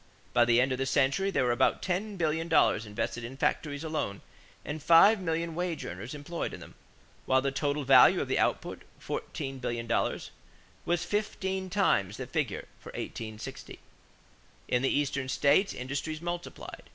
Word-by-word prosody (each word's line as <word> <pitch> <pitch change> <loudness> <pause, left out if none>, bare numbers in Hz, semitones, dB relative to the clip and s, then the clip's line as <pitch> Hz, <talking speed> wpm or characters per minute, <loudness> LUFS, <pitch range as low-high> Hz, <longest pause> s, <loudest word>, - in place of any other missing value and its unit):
By 120 -1 +5
the 120 0 +4
end 130 +2 +2
of 130 - -1
the 135 - 0
century 140 +8 +2
there 195 - +1
were 125 - +2
about 120 +2 +2
ten 200 +3 -2
billion 160 -1 0
dollars 115 -9 +3
invested 105 +3 -3
in 125 +3 -7
factories 145 +1 -1
alone 155 -11 -3 0.4
and 150 +1 -5
five 170 +7 +7
million 165 -1 -2
wage 175 -1 -3
earners 100 - -6
employed 155 +4 -4
in - - -11
them; - - -12 0.5
while 130 - +4
the 135 +1 -1
total 145 +1 -1
value 130 -1 +7
of - - -2
the - - 0
output, - - -1 0.2
fourteen 135 -3 -5
billion 120 -2 -3
dollars, 115 - -1 0.5
was 175 0 0
fifteen 190 -3 -2
times 110 - +1
the 130 - -5
figure 140 -5 -2
for - - -11
1860. 110 -1 -7 0.9
In 125 - +1
the 135 - +2
Eastern 140 -2 -1
states 145 +9 +3
industries 140 +5 -4
multiplied. 175 +1 -6
145 Hz, 165 wpm, -29 LUFS, 125-170 Hz, 0.9 s, five